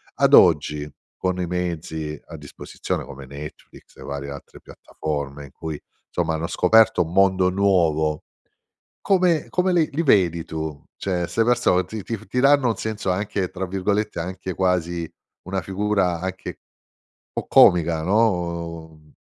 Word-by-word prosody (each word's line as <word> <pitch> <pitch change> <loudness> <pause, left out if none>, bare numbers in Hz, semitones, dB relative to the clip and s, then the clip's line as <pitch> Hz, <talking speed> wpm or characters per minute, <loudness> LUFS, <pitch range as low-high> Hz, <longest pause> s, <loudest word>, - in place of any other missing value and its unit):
Ad - - +2
oggi, 75 -3 +4 0.3
con 90 0 -1
i 90 - -2
mezzi 80 -3 -4
a - - -9
disposizione - - -5
come 70 -1 -10
Netflix 70 +3 -11
e - - -11
varie 70 0 -5
altre 70 - -10
piattaforme 70 -2 -6
in 70 - -15
cui 80 -2 -6 0.3
insomma 80 - -1
hanno 80 +1 -3
scoperto 110 +6 +4
un 80 - -8
mondo 95 -1 +4
nuovo, 85 -6 +1 0.8
come 180 -5 +2
come 180 +1 +1
li 165 -3 +2
li 160 - 0
vedi 90 - +3
tu? 80 -3 -5
Cioè 90 -3 -2
'ste 115 +6 +1
persone 120 -6 +2
ti 110 -2 -7
ti 115 +2 -4
ti 125 - -1
danno 140 -2 +4
un 110 - 0
senso 110 -4 -3
anche 95 -1 -1
tra 95 0 -4
virgolette 100 +1 -1
anche 95 +1 -5
quasi 85 -2 0 0.4
una 95 +1 -3
figura 95 -2 0
anche 95 -1 -6 0.7
po' - - -4
"comica" 85 -2 +5
no. 85 -5 -1
90 Hz, 145 wpm, -23 LUFS, 80-100 Hz, 0.8 s, comica